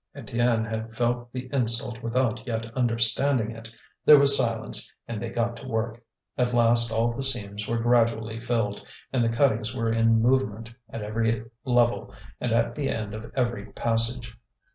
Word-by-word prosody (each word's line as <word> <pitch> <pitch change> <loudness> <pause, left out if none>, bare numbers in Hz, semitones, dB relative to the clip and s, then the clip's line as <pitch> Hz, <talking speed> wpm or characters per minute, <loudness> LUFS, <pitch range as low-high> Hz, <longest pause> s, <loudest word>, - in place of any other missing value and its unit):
Étienne 115 -1 -1
had 110 +1 -6
felt 120 0 -1
the 130 0 -6
insult 115 -2 0
without 120 0 -2
yet 115 -1 -3
understanding 120 0 +4
it. 115 0 -11 0.3
There 150 - +8
was 140 0 +9
silence, 115 -4 -1 0.2
and 115 -2 -5
they 120 - -4
got 115 0 -2
to 130 - -11
work. 115 0 -3 0.4
At 125 -1 0
last 115 -1 +4
all 115 +1 0
the 120 - -5
seams 105 -6 -2
were 115 - -1
gradually 115 -1 +1
filled, 115 -4 -2 0.3
and 125 -3 +1
the 115 - +1
cuttings 115 -1 0
were 115 -2 -1
in 115 0 +3
movement 115 -2 0 0.2
at 115 -2 -7
every 110 +1 -2 0.2
level 120 -2 +1 0.3
and 120 - -3
at 115 +1 +1
the 140 +1 -3
end 110 -2 -4
of 110 +2 -9
every 120 -6 -2
passage. 115 0 -2
115 Hz, 165 wpm, -25 LUFS, 115-120 Hz, 0.4 s, was